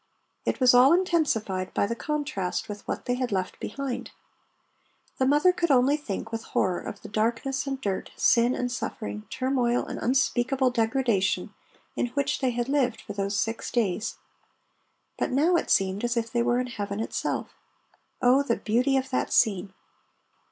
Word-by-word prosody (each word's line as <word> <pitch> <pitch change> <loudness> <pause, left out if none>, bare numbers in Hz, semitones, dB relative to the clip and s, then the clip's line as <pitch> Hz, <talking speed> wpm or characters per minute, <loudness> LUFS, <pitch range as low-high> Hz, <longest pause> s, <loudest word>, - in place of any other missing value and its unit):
It - - -1
was 255 -1 +6
all 255 +5 +7
intensified 275 - 0
by - - +2
the 230 - -2
contrast 290 -10 -2
with 205 -1 -7
what - - -4
they 245 - 0
had 250 -1 -2
left 185 -2 -2
behind. 275 -3 -4 1.1
The 260 - +3
mother 295 +6 +4
could 350 -2 0
only 270 +1 +4
think 225 -6 -5
with 225 0 -3
horror 185 -4 0
of 200 - -8
the - - -7
darkness 230 +6 -1
and 270 -1 -2
dirt, 200 -6 -3
sin 240 0 +3
and 245 -1 -2
suffering, 105 - -5
turmoil 255 -2 0
and - - -6
unspeakable 260 +1 +1
degradation 230 -4 0 0.4
in - - 0
which 280 -1 0
they 260 - +1
had 240 0 -2
lived 270 -3 +1
for 205 - -8
those 200 0 -2
six 225 +1 -2
days. 220 -2 -1 1.0
But - - 0
now 305 +7 +3
it - - 0
seemed 195 +2 +2
as 240 0 0
if 230 0 -1
they 240 - +1
were 240 +1 +2
in 250 - -1
heaven 205 -4 -4
itself. 225 - -3 0.7
Oh, 255 +3 +5
the 245 -5 0
beauty 250 +5 +1
of 265 0 -2
that 255 - -1
scene! 195 -4 +2
245 Hz, 170 wpm, -26 LUFS, 215-270 Hz, 1.1 s, all